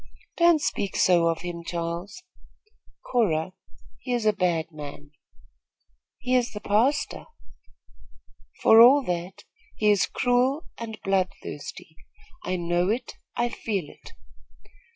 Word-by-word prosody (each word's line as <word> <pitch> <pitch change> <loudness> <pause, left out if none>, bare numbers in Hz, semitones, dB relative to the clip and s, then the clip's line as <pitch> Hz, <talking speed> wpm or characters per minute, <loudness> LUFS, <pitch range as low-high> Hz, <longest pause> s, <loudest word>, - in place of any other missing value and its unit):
"Don't 340 -2 +5
speak 200 -8 -2
so 175 -2 +4
of 165 -1 -1
him, 170 -1 -6
Charles." 170 - -5 0.9
"Cora, 185 -8 +1 0.5
he 250 0 -4
is 240 -2 -1
a 215 - +4
bad 175 -4 -1
man." 145 -1 -10 1.1
"He 255 - -3
is 245 -2 +2
the 210 - -6
pastor." 230 +9 0 1.4
"For 225 +1 +8
all 270 +4 +7
that, 180 -2 -4 0.3
he 210 -1 +3
is 200 -2 +2
cruel 255 +4 +1
and 220 -2 -7
bloodthirsty. 195 -1 -3 0.5
I 185 - -2
know 175 +1 0
it. 230 +4 -2 0.2
I 240 - 0
feel 200 -8 -3
it." - - -16
200 Hz, 120 wpm, -25 LUFS, 170-245 Hz, 1.4 s, For